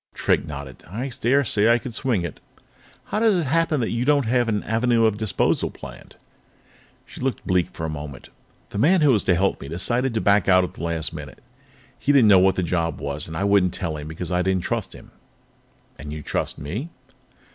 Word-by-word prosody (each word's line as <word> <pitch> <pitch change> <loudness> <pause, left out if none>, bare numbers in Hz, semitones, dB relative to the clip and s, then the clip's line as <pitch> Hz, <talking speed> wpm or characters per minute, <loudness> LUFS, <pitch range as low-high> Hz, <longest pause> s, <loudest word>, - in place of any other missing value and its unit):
Drake - - +1
nodded. 70 -3 -8
"I 125 +8 -4
dare 135 +4 +3
say 110 -2 +3
I 120 - +5
could 120 0 -7
swing 115 -7 0
it. 85 - -7 0.6
How 210 - -3
does 220 -2 +4
it 170 -3 0
happen 160 0 +1
that 115 - -1
you 115 +1 -1
don't 140 -1 +3
have 120 0 +1
an 105 -2 -1
avenue 115 +1 +2
of 110 -2 +2
disposal 110 -2 0
planned?" - - -12 0.9
She - - -11
looked 130 0 -2
bleak 90 -2 +1
for 80 - -5
a - - -3
moment. 75 -3 -8 0.4
"The 100 - -4
man 170 - +4
who 150 -2 +5
was 105 -6 +2
to 90 - +3
help 95 +3 0
me - - -7
decided 120 - 0
to - - +2
back 100 -2 +3
out 95 -1 +6
at 90 - -5
the - - -11
last 80 -1 -2
minute. 75 -5 -9 0.6
He 140 - +1
didn't 130 -7 +5
know 95 -2 +7
what 95 +1 +4
the 95 - -1
job 85 -2 -1
was, 70 +1 -3
and 80 0 -6
I - - -1
wouldn't 100 -3 +3
tell 85 -4 -3
him 75 0 -7
because 80 +2 -6
I 90 0 +1
didn't 95 -1 0
trust - - -3
him." - - -14 0.9
"And 75 +2 -7
you 75 0 -6
trust - - -2
me?" 105 - -5
100 Hz, 220 wpm, -23 LUFS, 85-125 Hz, 0.9 s, know